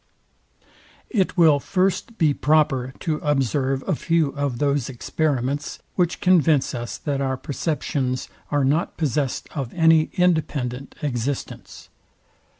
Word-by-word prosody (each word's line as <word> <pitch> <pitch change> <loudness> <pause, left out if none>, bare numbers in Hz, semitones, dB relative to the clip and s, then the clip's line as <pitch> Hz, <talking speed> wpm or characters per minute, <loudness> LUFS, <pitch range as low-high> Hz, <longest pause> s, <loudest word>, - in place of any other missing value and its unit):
It 195 -5 0
will 155 -4 +6
first 195 +6 -1
be 155 -3 +3
proper 145 -4 +2
to 160 -4 -1
observe 135 -2 0
a - - +2
few 165 0 +1
of 140 -3 -2
those 140 -1 0
experiments, 140 +1 -2 0.2
which 175 -2 0
convince 165 -6 +3
us, 120 -1 -5
that 140 -2 -2
our 130 -1 -1
perceptions 140 -3 -2 0.2
are 145 -2 +1
not 150 +5 0
possest 145 -3 -1
of 135 -5 -3
any 160 -2 +4
independent 140 -7 0
existence. 135 -1 -4
145 Hz, 120 wpm, -23 LUFS, 135-160 Hz, 0.2 s, will